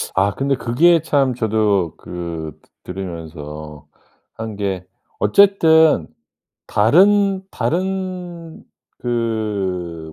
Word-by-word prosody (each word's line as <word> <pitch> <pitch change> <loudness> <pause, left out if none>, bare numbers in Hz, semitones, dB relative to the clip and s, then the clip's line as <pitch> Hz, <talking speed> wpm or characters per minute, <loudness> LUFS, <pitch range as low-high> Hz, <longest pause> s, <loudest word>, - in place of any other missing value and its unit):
아 100 +1 +3
근데 135 0 0
그게 160 +8 +3
참 135 -3 +1
저도 105 -7 0
그 85 -3 -6 0.3
드 90 - -7
들으면서 75 -5 -8 0.5
한 110 -1 -6
게 95 -3 -3 0.3
어쨌든 160 - +4 0.6
다른 195 - +4
다른 180 -2 -3 0.4
그 100 -9 -3
110 Hz, 140 characters per minute, -19 LUFS, -, 0.6 s, 어쨌든